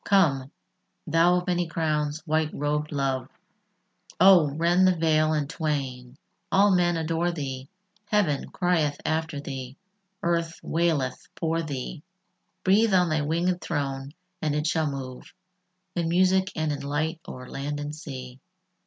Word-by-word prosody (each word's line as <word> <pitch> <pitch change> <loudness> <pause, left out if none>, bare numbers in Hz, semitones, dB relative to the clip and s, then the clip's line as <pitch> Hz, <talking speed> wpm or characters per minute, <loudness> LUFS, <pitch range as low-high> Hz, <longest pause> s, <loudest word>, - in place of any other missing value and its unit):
Come, 145 -9 +3 0.5
thou 165 +2 +4
of 180 0 0
many 175 -1 0
crowns, 155 -2 -1
white 155 -1 +1
robèd 150 +1 -1
love, 135 -2 -1 0.9
Oh! 185 -6 +7
rend 175 +3 +4
the 185 - +4
veil 155 -1 +3
in 150 -2 0
twain: 135 -5 -3 0.3
all 200 +1 +5
men 175 -1 +2
adore 165 +2 0
thee; 135 -4 -5 0.4
Heaven 200 -10 +1
crieth 165 -6 +1
after 160 -1 -1
thee; 135 -2 -6 0.5
earth 170 -1 0
waileth 160 -6 0
for 165 0 0
thee: 145 +1 -5 0.6
Breathe 205 +2 +4
on 180 -2 +4
thy 155 -1 +1
wingèd 170 +4 0
throne, 140 -2 -3 0.3
and 150 -2 0
it 150 0 -1
shall 160 -1 +1
move 130 -2 -7 0.6
In 170 -2 0
music 185 +2 +3
and 155 -1 0
in 145 -1 -3
light 150 +4 -2
o'er 125 0 -8
land 145 +3 -4
and 145 +1 -4
sea. 130 -5 -8
155 Hz, 140 wpm, -26 LUFS, 145-170 Hz, 0.9 s, Oh